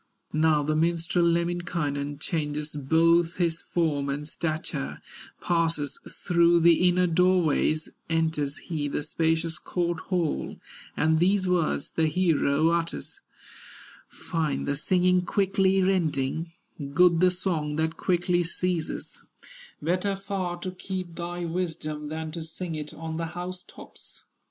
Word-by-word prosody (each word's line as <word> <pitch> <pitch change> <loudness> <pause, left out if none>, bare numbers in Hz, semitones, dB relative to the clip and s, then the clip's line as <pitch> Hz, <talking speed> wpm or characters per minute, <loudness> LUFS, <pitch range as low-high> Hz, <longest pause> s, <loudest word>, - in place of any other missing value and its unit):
Now 155 -1 +3
the 155 +1 0
minstrel, 170 +2 +1
Lemminkainen, 165 -4 -1
Changes 150 -1 -3
both 165 +4 +3
his 170 -2 0
form 150 -5 0
and 145 +2 -3
stature, 155 - -3 0.4
Passes 165 -4 0
through 170 -1 +3
the 170 +2 +5
inner 180 +1 +3
door 180 +1 +3
ways, 155 0 +1 0.2
Enters 160 -3 0
he 155 -4 -3
the 145 - -2
spacious 160 +1 0
court 175 -2 -2
hall, 175 -5 -1 0.4
And 160 0 +3
these 190 +2 +3
words 175 -5 0
the 160 -1 +1
hero 155 -2 +2
utters: 170 - -2 0.9
"Fine 160 -4 -2
the 145 - -1
singing 180 +3 +2
quickly 195 0 +2
ending, 165 -4 0 0.4
Good 180 -2 +5
the 185 +1 +5
song 175 -5 -1
that 160 +1 0
quickly 175 0 +1
ceases; 175 0 -3 0.6
Better 185 +5 0
far 195 -3 -3
to 185 - -3
keep 185 -1 -5
thy 175 +1 -4
wisdom 160 -3 -3
Than 160 0 -4
to 165 +1 -5
sing 165 +2 -5
it 150 -1 -5
on 160 0 -6
the 165 0 -2
house 180 +1 -5
tops." - - -12
165 Hz, 130 wpm, -27 LUFS, 155-180 Hz, 0.9 s, the